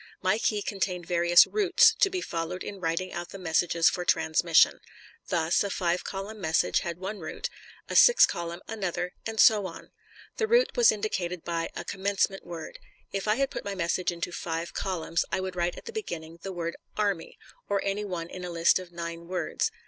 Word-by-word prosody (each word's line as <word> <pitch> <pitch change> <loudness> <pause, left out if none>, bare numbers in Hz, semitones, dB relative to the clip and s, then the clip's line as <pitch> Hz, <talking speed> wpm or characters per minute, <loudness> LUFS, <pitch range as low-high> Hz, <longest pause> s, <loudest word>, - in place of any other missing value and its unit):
My 195 +4 +2
key 210 -2 0
contained 185 -3 -2
various 175 0 +6
"routes," 400 -4 +4
to 390 - +5
be 370 -1 -3
followed 170 - -4
in 200 - -7
writing 170 +2 -2
out 175 0 -5
the - - -8
messages 170 -1 +2
for 180 - +1
transmission. 165 -1 +3 0.5
Thus, 170 0 +2
a 200 - -2
five 175 -2 0
column 200 +2 -6
message 160 -1 +2
had 170 -1 -4
one 195 +3 -5
route, 185 - -5 0.4
a - - -5
six 485 - +8
column 170 +1 -5
another, 190 -4 -3
and 220 -1 -5
so 210 -3 +6
on. 165 -2 -11 0.5
The 445 - +1
route 480 +2 +3
was 485 -2 +6
indicated 180 -5 -3
by 165 -1 -2
a - - -5
"commencement 195 0 -1
word." 170 -2 -8 0.3
If 195 +1 -3
I 210 - +3
had 275 +1 0
put - - -5
my 200 -1 -4
message 180 0 0
into 175 +1 -4
five 165 0 -4
columns, 170 -3 -1
I - - 0
would 185 -1 -4
write 175 0 -1
at - - -11
the 465 - -8
beginning 170 - -6
the 195 - -5
word 170 -2 -4 0.2
"Army," 200 -5 -1 0.3
or 200 -1 +2
any 200 +1 -1
one 175 -5 -4
in 180 +1 -8
a 180 - -4
list 170 +1 +3
of 180 -1 -10
nine 170 0 -6
words. 180 0 -1
180 Hz, 195 wpm, -28 LUFS, 170-200 Hz, 0.5 s, six